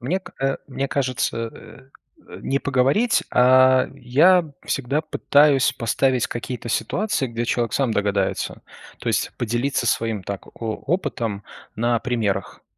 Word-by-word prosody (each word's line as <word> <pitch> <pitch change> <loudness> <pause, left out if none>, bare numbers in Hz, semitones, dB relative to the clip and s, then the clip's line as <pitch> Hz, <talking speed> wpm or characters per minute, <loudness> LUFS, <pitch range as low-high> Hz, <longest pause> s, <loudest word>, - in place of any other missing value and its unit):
Мне, 160 +10 -1 0.2
э, 135 0 +1
мне 135 0 -3
кажется, 125 -4 -1
э, 115 +5 -15 0.5
не 135 - 0
поговорить, 140 - +2
а 130 +1 +5
я 145 +8 +4 0.2
всегда 140 +2 -1
пытаюсь 145 -3 +3
поставить 130 +1 +1
какие-то 120 0 -6
ситуации, 155 - -1
где 120 -1 -3
человек 120 0 -1
сам 135 -5 +1
догадается. 100 -2 -1 0.4
То - - -4
есть - - 0
поделиться 120 +2 -1
своим, 115 -3 0
так, 100 0 -6
о 110 -2 -2
опытом 130 - -2 0.3
на 120 +1 +1
примерах. 110 -6 -2
125 Hz, 125 wpm, -22 LUFS, 115-140 Hz, 0.5 s, а